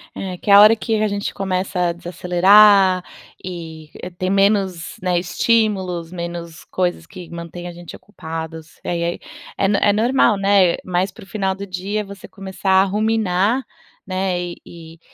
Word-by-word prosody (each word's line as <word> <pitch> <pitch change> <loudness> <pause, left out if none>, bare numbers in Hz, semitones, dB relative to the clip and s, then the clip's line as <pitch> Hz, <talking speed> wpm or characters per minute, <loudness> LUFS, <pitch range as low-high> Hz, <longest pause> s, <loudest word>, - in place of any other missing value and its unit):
É, 185 -2 -5
que - - -7
é 200 - +7
a 200 - +10
hora 215 +2 +7
que 220 -1 -1
a 215 - +2
gente 205 0 -3
começa 185 -2 -1
a - - -2
desacelerar 185 +2 +4 0.4
e 160 -4 -8 0.3
ter 185 +1 -2
menos, 195 -3 +1
né, 180 -1 0
estímulos, 185 -3 0
menos 170 -2 -7
coisas 175 -2 -2
que 180 -1 -11
mantém 170 +1 -8
a - - -6
gente 175 0 -11
ocupados. 160 -4 -8
É, 175 - -2
e 170 - -2
aí 170 +1 -2 0.4
é 195 - +2
no 200 - +2
é 205 0 +3
normal, 225 -1 +3
né, 195 -3 +3
mais 180 +1 -1
para - - -14
o - - -16
final 195 -2 -1
do 200 +1 -7
dia 195 +3 -3
você 200 -1 -11
começar 195 0 -4
a - - +4
ruminar, 210 +2 +1 0.4
né, 185 -1 -2
e 175 -1 -6
e 165 -1 -13
185 Hz, 175 wpm, -20 LUFS, 175-200 Hz, 0.4 s, a